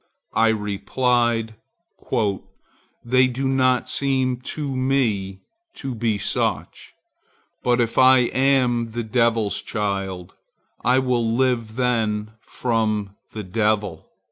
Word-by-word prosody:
I 115 0 +3
replied, 115 +2 0 1.5
"They 130 +2 +4
do 130 +2 -2
not 130 -2 +2
seem 130 -2 0
to 135 +2 -5
me 115 -8 0 0.3
to 135 -2 -5
be 110 -2 0
such; 100 - -2 0.7
but 125 0 +2
if 115 -1 +1
I 130 0 +7 0.2
am 125 -4 +2
the 120 0 -2
Devil's 115 -3 +1
child, 95 -4 -3 0.5
I 125 +1 +3
will 125 -3 +1
live 120 -4 0
then 110 -4 0
from 110 -4 -2 0.2
the 110 - -5
Devil." 105 -3 -1
115 Hz, 105 wpm, -22 LUFS, 105-130 Hz, 1.5 s, I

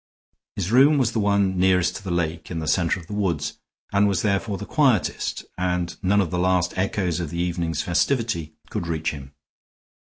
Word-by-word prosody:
His 100 0 -2
room 140 +5 +6
was 125 -4 +2
the 115 - -1
one 100 -2 +2
nearest 90 0 +3
to 95 - -11
the 95 - -5
lake 85 -2 -2
in 85 - -4
the 80 -1 -3
center 85 +1 +1
of 85 - -12
the 105 - -8
woods, 90 -8 -1 0.3
and 100 +1 +4
was 95 -3 0
therefore 100 0 0
the 105 - -6
quietest, 130 -5 +1
and 90 -1 -1
none 100 +2 +3
of 85 -5 -2
the 90 - -1
last 90 0 +1
echoes 90 -2 -1
of 85 -3 -3
the 85 - -6
evening's 85 -3 -1
festivity 90 - 0 0.2
could 85 - -3
reach 80 -1 -1
him. 70 -2 -10
90 Hz, 195 wpm, -23 LUFS, 85-100 Hz, 0.3 s, room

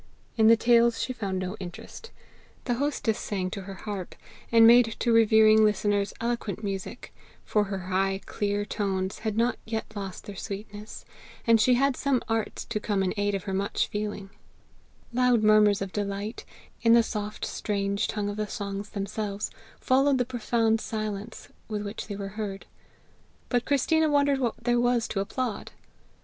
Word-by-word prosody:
In 220 -1 +4
the 230 0 +7
tales 235 0 +4
she 255 - -2
found 200 -6 -3
no 185 +2 -3
interest. 185 - -9 0.6
The 245 - +1
hostess 285 -7 0
sang 185 -3 -3
to 195 - -5
her 195 +1 -8
harp, 195 -2 -6 0.4
and 230 -1 +7
made 230 -1 +6
to 235 - +1
revering 220 -1 +6
listeners 205 -1 +1
eloquent 230 -4 -3
music, 195 +4 -5 0.3
for 210 -1 +2
her 195 -1 -4
high 195 +1 +1
clear 205 0 -1
tones 190 -2 -2
had 215 -1 -3
not 235 +1 +1
yet 220 -1 -3
lost 195 -2 -6
their 205 - -8
sweetness, 205 +2 -7 0.4
and 230 -1 +5
she 250 +3 +5
had 275 +1 +2
some 275 -3 0
art 225 -1 -1
to 225 -2 -1
come 205 -2 0
in 185 - 0
aid 205 -1 0
of 195 - -4
her 195 - -4
much 195 +1 0
feeling: 205 -2 -4 0.8
loud 250 -2 +3
murmurs 210 -2 +5
of 190 - -7
delight, 205 +2 -4 0.4
in 230 0 +5
the 235 0 +6
soft 210 -2 -4
strange 200 -1 -1
tongue 210 -2 -2
of 205 0 -4
the 215 0 -2
songs 200 -2 -5
themselves, 200 +1 -4 0.3
followed 270 +1 +3
the 250 - +1
profound 230 -2 +1
silence 215 -1 -5 0.2
with 210 -2 -3
which 205 +1 -6
they 205 - -5
were 195 0 -5
heard, 200 -1 -5 0.8
but 245 -1 +1
Christina 315 +3 +2
wondered 285 -1 +3
what 240 -4 0
there 240 0 +2
was 245 -1 +2
to 195 - -2
applaud. 225 +3 -3
215 Hz, 170 wpm, -27 LUFS, 200-235 Hz, 0.8 s, the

